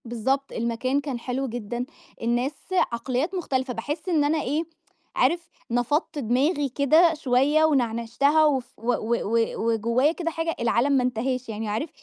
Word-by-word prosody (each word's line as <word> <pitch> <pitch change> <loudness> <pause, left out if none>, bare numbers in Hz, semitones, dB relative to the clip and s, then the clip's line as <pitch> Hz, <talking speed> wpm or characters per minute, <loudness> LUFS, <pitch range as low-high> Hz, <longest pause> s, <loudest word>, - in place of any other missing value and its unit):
بالضبط. 265 +4 -1
المكان 235 +4 -1
كان 275 -4 -4
حلو 260 +3 -3
جدًا، 240 +1 -4 0.4
الناس 240 +4 0 0.4
عقليّات 255 +9 -2
مختلِفة، 260 -7 -1
باحس 290 - -4
إن 315 -4 +3
أنا 300 +1 +1
إيه، 295 +5 -1 0.5
عارف 340 +7 +1 0.2
نفَضت 290 +6 0
دماغي 275 +5 +1
كده 310 +6 +4
شوية، 295 +1 +3
ونعنِشتها 265 +2 +2
وف 260 -4 0
و 235 +3 0
و 235 +1 0
و 230 +2 0 0.2
وجوّايا 235 +6 +2
كده 335 0 -3
حاجة، 330 0 -2
العالم 235 +3 +2
ما 265 -2 +3
انتهاش، 250 +1 -2
يعني 220 0 -4
عارف 220 +10 -2
260 Hz, 150 wpm, -25 LUFS, 235-295 Hz, 0.5 s, كده